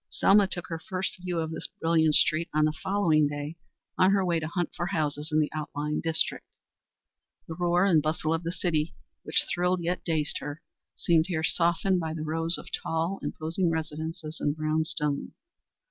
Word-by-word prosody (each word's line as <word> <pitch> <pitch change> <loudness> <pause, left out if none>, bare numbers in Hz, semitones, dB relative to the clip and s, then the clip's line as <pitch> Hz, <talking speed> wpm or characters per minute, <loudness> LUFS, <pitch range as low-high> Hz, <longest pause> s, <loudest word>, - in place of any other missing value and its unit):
Selma 200 0 +4
took 175 -2 -4
her 165 -1 -5
first 185 0 -3
view 180 -1 -3
of 160 -1 -2
this - - -4
brilliant 160 -2 +3
street 165 +2 +3
on 155 0 +4
the 155 - +2
following 155 -2 +2
day 145 +2 -5 0.4
on 185 - +6
her 195 -1 +3
way 170 -2 +1
to 155 - -4
hunt 175 0 -2
for 175 - -2
houses 155 -4 -2
in 155 - +3
the 150 - +1
outlying 150 -1 -3
district. 165 -1 +1 1.0
The 160 - -5
roar 175 +2 +2
and 170 -6 +4
bustle 155 +1 0
of 165 - -1
the 170 0 -3
city, 165 -3 -1 0.3
which - - +1
thrilled 180 0 +1
yet 175 +2 -2
dazed 155 -3 0
her, 145 +2 -7 0.3
seemed 165 -1 +2
here 160 -4 -2
softened 175 +3 +2
by 160 -1 -3
the 155 - -4
rows 165 +2 +3
of - - -10
tall, 165 +4 -2
imposing 165 +3 -1
residences 160 0 -4
in 145 - +1
brown 155 +1 0
stone. 150 -3 -1
160 Hz, 185 wpm, -28 LUFS, 155-175 Hz, 1.0 s, on